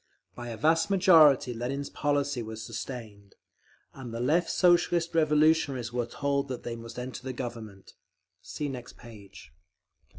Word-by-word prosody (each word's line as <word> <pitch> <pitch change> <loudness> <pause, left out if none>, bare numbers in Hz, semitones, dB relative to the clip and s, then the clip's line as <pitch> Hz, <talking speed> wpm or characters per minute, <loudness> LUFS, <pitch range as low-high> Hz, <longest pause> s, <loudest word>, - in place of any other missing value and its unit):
By 120 -1 -8
a 115 - -6
vast 160 - +2
majority 160 -10 +5
Lenin's 130 +5 -4
policy 145 -3 -1
was 110 0 -7
sustained, 110 -3 -8 0.6
and 130 -3 -9
the 115 - -5
Left 155 +8 +1
Socialist 175 -1 +2
Revolutionaries 150 -6 +2
were 120 -1 -1
told 140 +2 -1
that 130 -2 -6
they 120 - -4
must 115 0 -10
enter 125 0 -6
the 130 0 -5
government…. 115 -6 -8 0.5
_See 150 - -5
next 125 -3 -8
page. 100 -9 -14
130 Hz, 140 wpm, -28 LUFS, 115-150 Hz, 0.6 s, majority